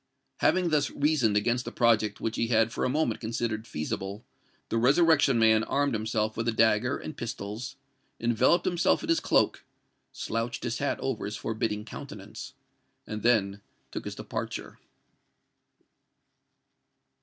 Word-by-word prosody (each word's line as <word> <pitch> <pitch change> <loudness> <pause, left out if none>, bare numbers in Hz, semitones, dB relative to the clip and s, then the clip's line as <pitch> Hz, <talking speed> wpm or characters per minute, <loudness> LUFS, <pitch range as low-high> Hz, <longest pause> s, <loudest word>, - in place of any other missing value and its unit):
Having 180 -2 +2
thus 150 -3 +2
reasoned 145 -8 +2
against 120 +4 +1
the - - -6
project 110 -3 +2
which 115 - -2
he 115 - 0
had 115 -1 +3
for - - -2
a - - +2
moment 135 -5 0
considered 115 -1 -2
feasible, 95 +7 -4 0.4
the - - 0
Resurrection 145 +1 +4
Man 110 -1 +5
armed 140 +1 0
himself 110 0 -1
with 115 +1 -2
a - - +3
dagger 115 +3 +3
and 155 - -7
pistols, 115 +3 -5 0.4
enveloped 120 +9 +3
himself 175 - +2
in 320 - -5
his 330 - +4
cloak, - - +2 0.5
slouched 115 +1 -3
his 120 -2 -2
hat 140 - -1
over 130 -5 -2
his 105 +1 -4
forbidding 110 -1 -2
countenance, - - -9 0.5
and 105 0 -5
then 100 -4 +2 0.3
took - - -5
his - - -5
departure. - - -5
115 Hz, 145 wpm, -28 LUFS, 110-135 Hz, 0.5 s, Man